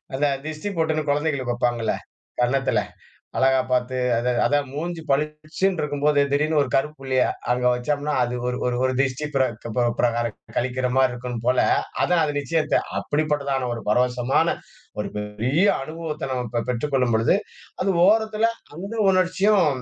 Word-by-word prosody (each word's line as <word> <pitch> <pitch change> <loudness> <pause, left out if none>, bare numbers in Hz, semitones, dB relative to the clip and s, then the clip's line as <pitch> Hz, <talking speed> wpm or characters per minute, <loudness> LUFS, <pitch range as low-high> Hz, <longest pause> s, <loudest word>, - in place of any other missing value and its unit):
அந்த 145 +2 +2 0.2
திஷ்டி 155 +6 -4
பொட்டுனு 155 -1 0
குழந்தைகளுக்கு 140 -5 0
வப்பாங்கள்ல 120 -2 0 0.5
கன்னத்துல 135 +2 +2 0.6
அழகா 130 0 +4
பாத்து. 125 0 0 0.2
அத 120 +2 -1 0.2
அதான் 145 -1 +2
மூஞ்சி 165 +2 -4
பளிச்சுனு 150 +6 0
இருக்கும் 145 -1 -3
போது, 150 -1 +4
திடீரென்று 150 +1 +2
ஒரு 140 - -1
கருப்புள்ளிய 135 -2 0 0.3
அங்க 125 0 0
வைச்சோம்னா 145 +4 -1
அது 120 0 -2
ஒரு 125 0 -1 0.3
ஒரு 130 - +2
திருஷ்டி 135 +2 0
பிரக் 130 -4 +1
பிப 120 +1 0
பிரகாரம் 120 -2 +1 0.2
கழிக்கிற 125 +1 0
மாரி 130 -1 +4
இருக்கும் 125 -1 -5
போல. 125 0 +3 0.4
அதான் 175 -2 +3
அது 145 -1 0
நிச்சயத்த 155 +3 +1 0.2
அப்படிப்பட்டதான 145 -4 -1
ஒரு 115 - -5
பரவசமான 125 +6 +2 0.5
ஒரு 105 - -2
பெரிய 115 - 0 0.2
அனுபவத்தை 155 -2 -5
நாம 125 -1 -2
ப 115 - +2
பெற்றுக் 125 +4 -2
கொள்ளும் 125 -3 +2
பொழுது, 115 +9 +3 0.5
அது 195 - +1 0.2
ஓரத்தில 220 +1 +3 0.3
அந்த 195 +7 -6
உணர்ச்சியும் 190 +1 +3
140 Hz, 145 wpm, -23 LUFS, 125-155 Hz, 0.6 s, அழகா